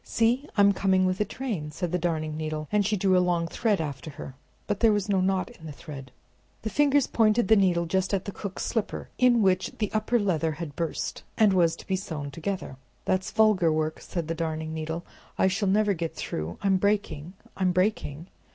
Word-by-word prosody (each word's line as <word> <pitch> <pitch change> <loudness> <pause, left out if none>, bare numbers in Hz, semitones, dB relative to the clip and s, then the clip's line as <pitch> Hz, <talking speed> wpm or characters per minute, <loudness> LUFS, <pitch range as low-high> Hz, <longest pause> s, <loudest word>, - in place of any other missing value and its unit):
"See, 240 +5 +1
I'm 200 0 +6
coming 190 -1 +2
with 185 +2 0
a - - +2
train!" 210 - -4
said 165 +3 -4
the 180 - 0
Darning 155 -3 -1
Needle, 155 -1 -4
and 210 0 +3
she 210 +1 0
drew 190 0 +3
a 180 - +5
long 175 -2 +1
thread 210 +3 0
after 145 -2 -4
her, 140 -2 -8 0.3
but 205 -2 -2
there 225 -2 +5
was 205 -1 0
no 195 -2 +2
knot 190 +3 0
in 160 -9 -12
the - - -6
thread. 140 -3 -9 0.5
The 220 - -3
Fingers 285 -1 +3
pointed 220 -1 +2
the 220 - +8
needle 180 -4 +3
just 190 +2 0
at 195 -2 -1
the 200 - -4
cook's 200 -1 -5
slipper, 225 -4 -3
in 240 -3 +5
which 185 -1 +2
the 210 -3 -1
upper 215 +3 +1
leather 165 -6 0
had 150 -2 -7
burst, 165 -2 -3 0.2
and 210 -3 +5
was 170 -3 +3
to - - -13
be 190 - 0
sewn 160 -7 -5
together. 165 -3 -4 0.3
"That's 185 0 0
vulgar 210 -7 +4
work," 155 0 -1
said 170 -4 -4
the 165 - -1
Darning 160 -1 -3
Needle. 160 +2 -4 0.3
"I - - +3
shall 200 +1 +1
never 210 +1 +3
get 165 -2 -4
through. 80 +2 -4
I'm 195 -1 +3
breaking! 190 -5 -1 0.2
I'm 185 -2 +1
breaking!" 180 -5 0
185 Hz, 210 wpm, -27 LUFS, 160-205 Hz, 0.5 s, the